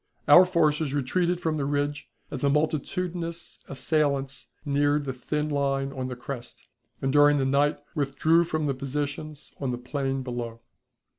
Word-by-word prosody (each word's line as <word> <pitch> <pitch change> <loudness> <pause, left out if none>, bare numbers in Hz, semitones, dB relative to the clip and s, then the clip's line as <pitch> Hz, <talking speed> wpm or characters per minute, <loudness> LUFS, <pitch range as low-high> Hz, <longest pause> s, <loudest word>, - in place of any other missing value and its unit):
Our 185 - +9
forces 155 -5 +1
retreated 175 +6 +1
from 160 -3 -1
the 140 - -1
ridge 145 +1 -1 0.2
as 140 - -4
the 140 - +3
multitudinous 165 +3 -2
assailants 140 -1 0 0.2
neared 145 0 +2
the 130 - -2
thin 150 +4 -2
line 140 -2 0
on 130 -2 -3
the 125 - -5
crest, 125 -1 -8 0.4
and 135 0 +1
during 145 0 +6
the 135 - +1
night 140 +2 +2 0.2
withdrew 155 +3 +2
from 155 -2 -1
the 140 - +1
positions 145 +2 -4
on 135 - -2
the 125 - -2
plain 135 +1 -2
below. 120 -2 -5
145 Hz, 155 wpm, -27 LUFS, 135-155 Hz, 0.4 s, Our